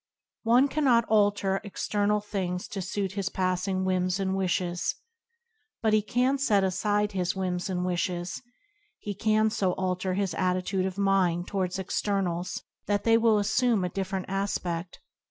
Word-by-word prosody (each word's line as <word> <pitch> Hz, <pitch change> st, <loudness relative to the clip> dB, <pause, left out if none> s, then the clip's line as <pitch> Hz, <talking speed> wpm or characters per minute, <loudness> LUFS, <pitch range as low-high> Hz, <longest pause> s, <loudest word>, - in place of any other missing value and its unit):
One 245 Hz, +4 st, +4 dB
cannot 265 Hz, -6 st, +3 dB
alter 205 Hz, -2 st, +2 dB
external 205 Hz, 0 st, 0 dB
things 185 Hz, -3 st, -3 dB
to 195 Hz, -, -4 dB
suit 190 Hz, +1 st, -2 dB
his 200 Hz, -1 st, -2 dB
passing 185 Hz, 0 st, -1 dB
whims 185 Hz, 0 st, +1 dB
and 190 Hz, -1 st, 0 dB
wishes, 185 Hz, +7 st, -1 dB, 0.9 s
but 220 Hz, -1 st, +3 dB
he 215 Hz, -, +5 dB
can 250 Hz, +6 st, +1 dB
set 210 Hz, -8 st, +3 dB
aside 205 Hz, +2 st, +1 dB
his 185 Hz, -2 st, -1 dB
whims 185 Hz, 0 st, -2 dB
and 180 Hz, -1 st, -1 dB
wishes; 175 Hz, 0 st, -2 dB, 0.6 s
he 205 Hz, -, -5 dB
can 215 Hz, +2 st, +2 dB
so 195 Hz, -4 st, +1 dB
alter 185 Hz, 0 st, -1 dB
his 195 Hz, -1 st, -1 dB
attitude 185 Hz, +1 st, 0 dB
of 190 Hz, 0 st, -6 dB
mind 190 Hz, -3 st, +2 dB
towards 185 Hz, -2 st, -1 dB
externals 185 Hz, -2 st, -2 dB, 0.2 s
that 205 Hz, -1 st, +1 dB
they 225 Hz, 0 st, +5 dB
will 225 Hz, -1 st, +4 dB
assume 220 Hz, 0 st, +2 dB
a 180 Hz, -, -1 dB
different 190 Hz, 0 st, -3 dB
aspe6l. 190 Hz, -3 st, -2 dB
195 Hz, 150 wpm, -27 LUFS, 185-210 Hz, 0.9 s, he